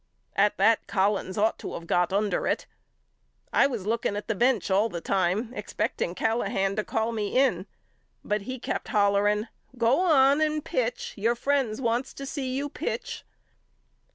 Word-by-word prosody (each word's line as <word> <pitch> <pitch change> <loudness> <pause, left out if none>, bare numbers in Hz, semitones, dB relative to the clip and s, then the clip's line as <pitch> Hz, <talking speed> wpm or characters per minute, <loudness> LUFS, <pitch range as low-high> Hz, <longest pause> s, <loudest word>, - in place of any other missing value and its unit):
At 205 +1 +3
that 220 +3 +3
Collins 195 -1 0
ought 215 +2 +1
to - - -6
of 170 - -7
got 175 +1 +1
under 205 +1 0
it. - - 0 0.9
I - - +5
was 235 -8 -5
looking 220 -1 0
at 205 - -5
the 225 - +1
bench 235 -2 +1
all 205 +4 +3
the 175 - -5
time 195 +6 0
expect 210 - -3
ing 175 - -1
Callahan 200 -3 0
to 215 - +1
call 225 +2 -1
me 215 0 -2
in 270 0 +2 0.6
but 210 0 -1
he 255 +6 -5
kept - - -4
hollering 205 +1 +2 0.3
Go 235 +5 +3
on 285 -5 +4
and 305 -1 0
pitch. 245 -1 -2
Your 230 +4 +1
friends 260 -3 0
wants 240 0 -1
to 275 - -6
see 270 -2 -3
you 280 +2 -1
pitch. - - -4
220 Hz, 170 wpm, -27 LUFS, 200-255 Hz, 0.9 s, I